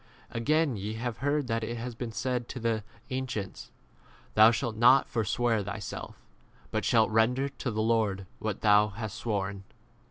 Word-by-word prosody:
Again, 145 +2 +1
ye 105 +3 -4
have 115 0 -3
heard 145 +2 +1
that 115 -2 -1
it 120 +2 -3
has 120 +1 -5
been 115 0 -5
said 125 +1 -2
to 125 - -5
the 115 -2 0 0.3
an 130 0 -2
cients, 100 -6 -5 0.6
Thou 110 +1 +8
shalt 115 0 -1
not 125 +4 +6
forswear 115 0 0
thyself, 100 +1 -6 0.5
but - - -1
shalt 110 -1 +3
render 125 +5 +3
to 135 -1 -5
the 110 - -5
34 - - 0
Lord 110 -4 +1
what 110 -2 -3
thou 105 0 +5
hast 110 +1 -6
sworn. 100 -4 -3
115 Hz, 170 wpm, -29 LUFS, 105-125 Hz, 0.6 s, Thou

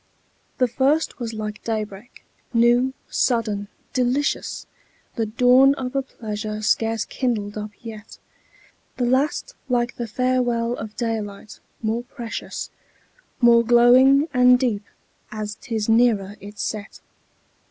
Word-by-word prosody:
The 255 - +3
first 275 +7 +1
was 235 -2 -3
like 215 -1 -6
day 220 -2 -1
break, 210 +3 -13 0.3
new, 240 +3 +4 0.2
sudden, 215 -5 0 0.3
delicious, 255 +3 -1 0.5
The 225 -1 -1
dawn 250 +5 +5
of 260 -1 -5
a 275 - +2
pleasure 215 -4 -6
scarce 225 0 +1
kindled 215 -6 -2
up 210 0 -5
yet; 220 -2 -10 0.8
The 250 - 0
last 265 +5 0 0.2
like 245 -1 0
the 235 - -3
farewell 245 0 0
of 220 -3 -7
daylight, 215 -3 -4 0.2
more 225 +2 0
precious, 240 -2 -6 0.7
More 235 -1 +6
glowing 250 +5 +6
and 250 0 +6
deep, 225 -5 -1 0.5
as 215 -1 -4
'tis 220 -3 -3
nearer 225 -4 +3
its 205 +1 -7
set. 215 -1 -5
235 Hz, 120 wpm, -22 LUFS, 215-250 Hz, 0.8 s, More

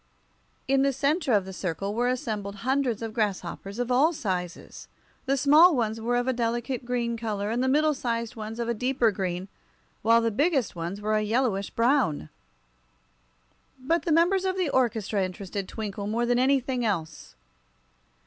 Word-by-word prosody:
In 270 0 +3
the 275 0 +3
center 285 +2 0
of 205 -4 +3
the 190 - -8
circle 185 +2 -3
were 240 +3 0
assembled 220 -6 -3
hundreds 260 -4 0
of 225 -1 -5
grasshoppers, 205 -2 -3
of 245 0 -2
all 280 +7 +4
sizes. 185 - -5 0.4
The 275 +1 +2
small 305 +5 +6
ones 225 -2 -1
were 240 +2 0
of 245 +1 0
a 260 - +2
delicate 240 +2 -2
green 240 -1 -1
color, 215 -2 -3
and 240 +2 0
the - - +1
middle 300 +3 +3
sized 235 -3 -3
ones 220 +1 -6
of 235 - -2
a 235 - +1
deeper 250 0 +1
green, 185 -1 -3 0.5
while 230 +2 +5
the 230 0 0
biggest 275 - +1
ones 175 +4 -5
were 215 +1 -1
a - - +1
yellowish 215 -2 0
brown. 230 - +1 1.5
But 310 +5 0
the 335 - 0
members 350 +4 +3
of 380 0 -1
the 365 -5 0
orchestra 220 -5 +1
interested 190 +1 -5
Twinkle 205 -2 -5
more 230 +3 0
than 245 0 +2
anything 260 -1 +1
else. 165 -8 -3
235 Hz, 170 wpm, -26 LUFS, 205-265 Hz, 1.5 s, small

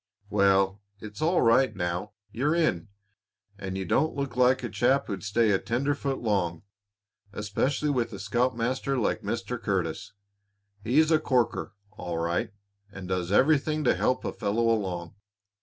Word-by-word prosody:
"Well, 100 0 +3 0.2
it's 105 +3 -9
all 170 +3 +3
right 120 +3 +4
now. 90 +2 -3 0.2
You're 140 +9 0
in, 110 - +1 0.7
and 95 0 -4
you 95 - -3
don't 155 +10 +1
look 140 -3 -3
like 125 +1 +3
a 120 - -3
chap 135 +3 +2
who'd 100 -3 -5
stay 110 +2 +2
a 95 - +2
tenderfoot 140 +3 -1
long, 95 -7 -1 0.7
especially 130 +9 -1
with 120 -4 -1
a 100 - -7
scoutmaster 125 +5 -1
like 115 - 0
Mr. 115 +3 -4
Curtis. 90 -6 -2 0.7
He's 155 +8 +3
a 155 - +5
corker, 125 -7 0 0.2
all 90 -5 -5
right, 85 +7 -1 0.4
and 95 -2 -8
does 90 -1 -2
everything 150 +6 +3
to 125 - +4
help 130 - 0
a - - -2
fellow 115 +2 0
along. 90 -5 -3
115 Hz, 150 wpm, -27 LUFS, 95-130 Hz, 0.7 s, a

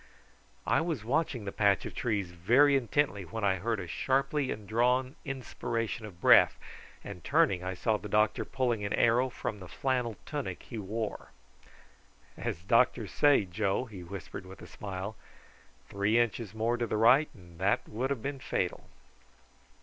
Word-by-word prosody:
I - - +3
was 160 -9 -2
watching 130 -3 0
the 100 - -3
patch 100 -2 +2
of - - -6
trees 100 -7 -2
very 120 +12 +4
intently 135 -4 +1
when 105 +6 -6
I 95 -1 +2
heard 110 +3 -1
a 90 - -5
sharply 135 - 0
drawn 125 +6 0
inspiration 115 -5 -3
of 90 -4 -14
breath, - - +6 0.5
and 95 -4 -8
turning 140 - +2
I 95 0 -3
saw 110 +4 +1
the 105 - -9
doctor 105 +1 +2
pulling 120 -5 -1
an 100 - -2
arrow 120 +3 +3
from 110 -3 -5
the 90 - -9
flannel 125 0 -1
tunic 145 -2 -4
he 115 - -7
wore. 105 +2 -4 1.1
"As 85 - -4
doctors 115 -1 +2
say, 145 -8 +4
Joe," 100 +5 -1
he 105 -6 -10
whispered 95 0 -8
with 95 - -12
a - - -8
smile, 100 +1 -6 0.7
"three 100 +3 +1
inches 115 -3 0
more 115 +2 0
to 120 -1 -1
the 110 - -1
right 125 +8 +5
and 85 -4 -16
that 95 +2 +1
would 125 +5 -2
have 135 -6 -3
been 140 -1 -3
fatal." 90 -8 -3
110 Hz, 165 wpm, -30 LUFS, 100-130 Hz, 1.1 s, breath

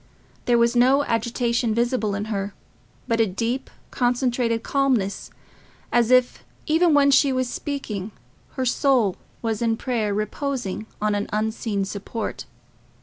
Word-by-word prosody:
There 240 -1 +4
was 235 +1 +3
no 260 +4 +5
agitation 235 -1 0
visible 235 -3 0
in 200 +1 -3
her, 200 0 -3 0.5
but 230 -2 +1
a 225 - +3
deep 235 +7 -2 0.2
concentrated 245 -2 0
calmness, 255 -8 0 0.6
as 240 -1 +3
if, 255 -1 +3 0.2
even 325 0 +3
when 280 -1 +5
she 275 0 +5
was 255 -1 0
speaking, 225 -7 -4 0.4
her 260 - -2
soul 250 -6 +2 0.3
was 225 -1 -1
in 225 -1 +1
prayer 225 -5 -1
reposing 215 0 -3 0.2
on 215 0 +2
an 205 0 -2
unseen 215 -1 -1
support. 205 +3 -5
235 Hz, 135 wpm, -23 LUFS, 215-255 Hz, 0.6 s, no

